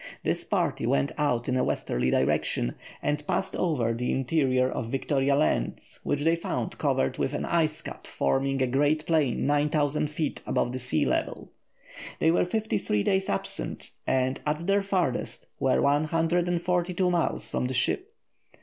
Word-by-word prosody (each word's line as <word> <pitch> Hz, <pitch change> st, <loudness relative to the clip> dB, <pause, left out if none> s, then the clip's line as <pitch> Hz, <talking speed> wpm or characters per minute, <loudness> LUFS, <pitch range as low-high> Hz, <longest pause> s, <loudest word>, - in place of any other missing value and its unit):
This -, -, -1 dB
party -, -, 0 dB
went 70 Hz, 0 st, +1 dB
out 125 Hz, -5 st, 0 dB
in 130 Hz, -, +1 dB
a 130 Hz, -, +2 dB
westerly 60 Hz, +1 st, 0 dB
direction -, -, +1 dB, 0.3 s
and 150 Hz, 0 st, 0 dB
passed 190 Hz, -, -1 dB
over 130 Hz, -10 st, +1 dB
the 125 Hz, +2 st, -2 dB
interior 130 Hz, -2 st, +2 dB
of 115 Hz, -, -3 dB
Victoria 135 Hz, +1 st, +1 dB
Land, 140 Hz, -, +1 dB, 0.2 s
which 145 Hz, 0 st, -1 dB
they 165 Hz, +1 st, +4 dB
found 170 Hz, -, -4 dB
covered 65 Hz, 0 st, 0 dB
with -, -, -1 dB
an -, -, -2 dB
ice 155 Hz, -2 st, 0 dB
cap -, -, -8 dB
forming 135 Hz, -, 0 dB
a -, -, +3 dB
great 145 Hz, +4 st, +1 dB
plain 155 Hz, -7 st, +1 dB
9000 145 Hz, 0 st, +1 dB
feet 155 Hz, -1 st, -3 dB
above 120 Hz, -, 0 dB
the 130 Hz, -, -3 dB
sea 125 Hz, -10 st, 0 dB
level. -, -, -2 dB, 0.7 s
They 160 Hz, -, +3 dB
were 170 Hz, -, +3 dB
fifty 220 Hz, +4 st, -1 dB
three 105 Hz, -1 st, 0 dB
days 190 Hz, -, +1 dB
absent, 95 Hz, -, -3 dB, 0.2 s
and, 130 Hz, 0 st, +1 dB
at 150 Hz, +3 st, -2 dB
their 200 Hz, +1 st, +3 dB
farthest, 185 Hz, -10 st, -1 dB
were 130 Hz, -1 st, +2 dB
142 175 Hz, +4 st, +1 dB
miles 170 Hz, -2 st, 0 dB
from -, -, -2 dB
the 130 Hz, -, -2 dB
ship. 370 Hz, -, +1 dB
145 Hz, 160 wpm, -27 LUFS, 130-165 Hz, 0.7 s, they